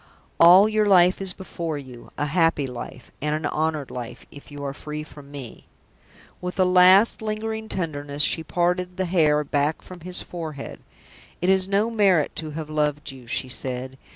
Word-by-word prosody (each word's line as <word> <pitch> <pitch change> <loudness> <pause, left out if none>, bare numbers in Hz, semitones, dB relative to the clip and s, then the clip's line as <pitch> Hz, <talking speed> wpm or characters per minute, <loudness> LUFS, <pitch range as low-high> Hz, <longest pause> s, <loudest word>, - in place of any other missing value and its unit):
"All 180 +5 +8
your 215 -1 +1
life 185 -1 +5
is 190 -1 0
before 170 -4 -5
you 130 -4 -11
a 145 - 0
happy 165 -1 +2
life, 125 -2 -8
and 150 +1 0
an 155 0 -4
honored 155 -3 -1
life, 120 -2 -7
if 145 - -13
you 145 -1 -8
are 140 -1 -3
freed 150 +1 -6
from 145 -2 -14
me!" 140 -5 -10 0.7
With 180 +2 -5
a 185 - +5
last, 185 +5 +6
lingering 220 0 -4
tenderness, 145 -5 -2
she 160 - +1
parted 180 +2 -1
the 190 - 0
hair 155 -4 +2
back 145 +2 -1
from 185 -1 -11
his 180 +2 0
forehead. 160 -5 -7 0.6
"It 180 - 0
is 190 -1 +3
no 205 +4 +1
merit 195 -8 +2
to 155 - -4
have 155 0 -6
loved 150 -1 -1
you," 130 -3 -13
she 130 - -2
said. 130 +1 -4
160 Hz, 180 wpm, -24 LUFS, 145-185 Hz, 0.7 s, All